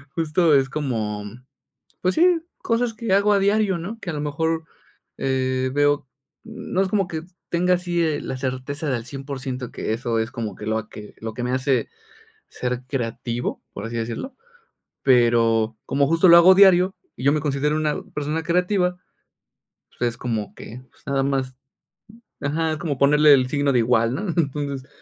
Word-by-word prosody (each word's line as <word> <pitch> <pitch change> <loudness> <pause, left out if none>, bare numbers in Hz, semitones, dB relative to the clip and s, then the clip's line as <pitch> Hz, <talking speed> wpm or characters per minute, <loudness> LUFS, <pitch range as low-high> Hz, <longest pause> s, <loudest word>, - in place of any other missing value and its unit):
justo 165 0 +2
es 135 0 +2
como, 110 -8 -3
mm, 115 +5 -11 0.6
pues 185 +1 +1
sí, 345 0 +4 0.2
cosas 230 0 0
que 220 -2 -2
hago 200 +1 +4
a 200 - +3
diario, 200 -1 +2
¿no? 195 +7 -6
Que 180 - -6
a - - -2
lo 150 - -3
mejor, 160 +2 -1 0.5
eh, 130 -1 0
veo, 145 -1 +2 0.4
n 225 0 -9
no 190 - +3
es 195 - +1
como 195 -2 +1
que 160 -2 -5 0.3
tenga 180 +1 +2
así, 175 -1 -1
eh, 155 -2 0
la - - -4
certeza 135 +4 -3
de 130 - +1
al 115 - -8
100%, 135 -2 -6
que - - -3
eso 115 -1 -1
es 110 +1 -2
como 110 -5 -5
que 105 - -9
lo 110 0 -1
que 105 -1 -11
lo 110 -1 -5
que 120 - -5
me 125 - -1
hace 130 -2 0 0.6
ser 125 0 -3
creativo, 120 -2 -3
por 100 +3 -6
así 115 - -5
decirlo. 120 - -4 0.7
Pero 115 -3 +3
como 140 +1 +2
justo 165 +4 +4
lo 170 - +9
hago 180 +2 +8
diario 190 -1 +6 0.2
y 125 - -7
yo 140 - +5
me 155 - +1
considero 145 +1 0
una 155 -1 -1
persona 150 +2 -2
creativa, 180 +1 +1 1.0
pues 120 - +1
es 115 - -11
como 110 -5 -3
que, 120 +3 -10
pues - - -27
nada 135 -1 0
más 135 -2 -1 0.9
ajá, 160 +2 -1
es 155 - -4
como 150 -3 -2
ponerle 150 +2 +6
el 130 -2 +2
signo 140 0 +1
de 125 - +3
igual, 115 0 +2
¿no? 200 +10 -3
Entonces, 140 -3 -2
140 Hz, 185 wpm, -23 LUFS, 125-170 Hz, 1.0 s, lo